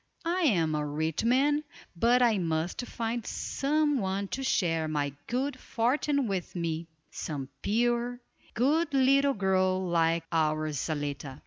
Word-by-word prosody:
I 350 Hz, +2 st, 0 dB
am 170 Hz, -, +2 dB
a 150 Hz, 0 st, 0 dB
rich 155 Hz, +4 st, -2 dB
man, 280 Hz, +5 st, +3 dB, 0.3 s
but 240 Hz, +7 st, +4 dB
I 225 Hz, -4 st, +3 dB
must 165 Hz, +2 st, -1 dB
find 230 Hz, 0 st, -3 dB
some 295 Hz, +3 st, 0 dB
one 195 Hz, 0 st, -2 dB
to 270 Hz, -, -3 dB
share 165 Hz, -11 st, +1 dB
my 145 Hz, -2 st, -1 dB
good 255 Hz, +2 st, -2 dB
fortune 275 Hz, +5 st, 0 dB
with 190 Hz, -3 st, -3 dB
me, 165 Hz, -1 st, -2 dB, 0.2 s
some 140 Hz, -4 st, -5 dB
pure, 240 Hz, +3 st, 0 dB, 0.4 s
good 285 Hz, +6 st, +2 dB
little 275 Hz, +1 st, +4 dB
girl 185 Hz, -2 st, +2 dB
like 165 Hz, -1 st, +2 dB
our 155 Hz, -1 st, +1 dB
Zaletta." 145 Hz, -2 st, -4 dB
195 Hz, 135 wpm, -29 LUFS, 160-255 Hz, 0.4 s, but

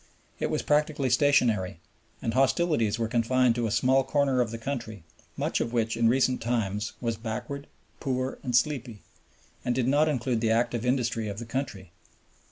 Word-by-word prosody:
It -, -, -1 dB
was -, -, -1 dB
practically 150 Hz, -3 st, +1 dB
stationary, 120 Hz, -, +2 dB, 0.4 s
and 115 Hz, -, -1 dB
hostilities 135 Hz, -4 st, +2 dB
were 115 Hz, -1 st, -1 dB
confined 120 Hz, +2 st, +2 dB
to 120 Hz, -1 st, -1 dB
a -, -, -2 dB
small 130 Hz, +4 st, +3 dB
corner 135 Hz, -1 st, +2 dB
of 120 Hz, -, 0 dB
the 115 Hz, -, -5 dB
country, 115 Hz, -, -5 dB, 0.3 s
much -, -, 0 dB
of 115 Hz, -, -2 dB
which 115 Hz, -1 st, 0 dB
in 115 Hz, 0 st, +3 dB
recent 130 Hz, +1 st, +2 dB
times 110 Hz, -3 st, -1 dB
was 115 Hz, -2 st, -2 dB
backward, 125 Hz, +5 st, -5 dB, 0.3 s
poor, 130 Hz, -2 st, -2 dB
and 125 Hz, -3 st, -2 dB
sleepy, 120 Hz, -5 st, 0 dB, 0.6 s
and 120 Hz, -, 0 dB
did 125 Hz, -1 st, +1 dB
not 150 Hz, +3 st, +3 dB
include 125 Hz, -4 st, -1 dB
the 115 Hz, -, +1 dB
active 120 Hz, +1 st, +1 dB
industry 120 Hz, -3 st, 0 dB
of 100 Hz, -1 st, -5 dB
the 120 Hz, -, -6 dB
country. 115 Hz, -8 st, -4 dB
120 Hz, 175 wpm, -27 LUFS, 115-135 Hz, 0.6 s, small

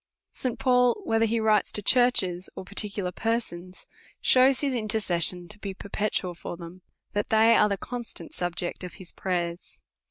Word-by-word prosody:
St. 255 Hz, -3 st, -3 dB
Paul, 250 Hz, -, +3 dB
whether 225 Hz, -5 st, +2 dB
he 225 Hz, +1 st, 0 dB
writes 215 Hz, -2 st, +3 dB
to 210 Hz, -, -1 dB
churches, 195 Hz, -8 st, +3 dB
or -, -, -7 dB
particu 205 Hz, 0 st, -3 dB
lar 180 Hz, -, -2 dB
persons, 185 Hz, -5 st, -3 dB, 0.3 s
shews 260 Hz, +1 st, +4 dB
his 280 Hz, -2 st, 0 dB
intercession 190 Hz, -6 st, +1 dB
to 210 Hz, -, -11 dB
be 200 Hz, -2 st, -5 dB
perpetual 200 Hz, -2 st, -2 dB
for 170 Hz, 0 st, -7 dB
them, 170 Hz, +1 st, -10 dB, 0.3 s
that 205 Hz, 0 st, -1 dB
they 225 Hz, +1 st, +5 dB
are 210 Hz, -, +5 dB
the 200 Hz, -, -1 dB
constant 235 Hz, -7 st, -7 dB
subject 175 Hz, 0 st, -3 dB
of 180 Hz, -, -7 dB
his 185 Hz, -2 st, -8 dB
pray 175 Hz, -2 st, -1 dB
ers. 170 Hz, -, -14 dB
205 Hz, 170 wpm, -27 LUFS, 180-230 Hz, 0.3 s, they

